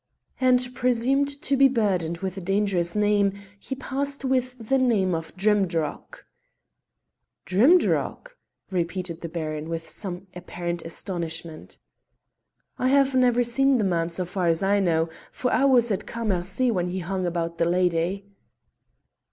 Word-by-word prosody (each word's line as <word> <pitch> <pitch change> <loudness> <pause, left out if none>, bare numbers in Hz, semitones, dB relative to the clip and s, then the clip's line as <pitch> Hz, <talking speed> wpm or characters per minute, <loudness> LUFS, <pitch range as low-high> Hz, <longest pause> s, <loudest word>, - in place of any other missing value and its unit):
"And 250 -1 +3
presumed 265 +3 0
to 280 - +1
be 275 0 +6
burdened 190 -10 0
with 190 -1 -3
a 195 - -6
dangerous 195 -2 0
name, 205 -1 +2 0.3
he 265 - -5
passed 275 +1 -3
with 255 -1 0
the 270 - +3
name 210 -8 +2
of 165 -1 -4
Drimdarroch." 190 -6 -1 1.2
"Drimdarroch!" 345 - +2 0.4
repeated 175 -1 -3
the 170 - -5
Baron 155 -1 -4
with 165 0 -4
some 185 -2 -4
apparent 175 -1 -5
astonishment. 165 -1 -4 1.0
"I 255 - +1
have 275 0 +3
never 245 -1 +3
seen 270 +3 +3
the 220 - 0
man, 170 -3 0
so 180 +2 -2
far 180 0 -2
as 165 +2 +2
I 200 +1 +3
know, 165 -4 +1 0.2
for 250 - -2
I 275 - +3
was 245 -4 +4
at 195 - -2
Cammercy 215 +1 0
when 180 -4 -1
he 180 +1 -4
hung 185 +1 -2
about 170 -1 -3
the 170 - +3
lady." 180 +2 0
195 Hz, 145 wpm, -25 LUFS, 170-250 Hz, 1.2 s, be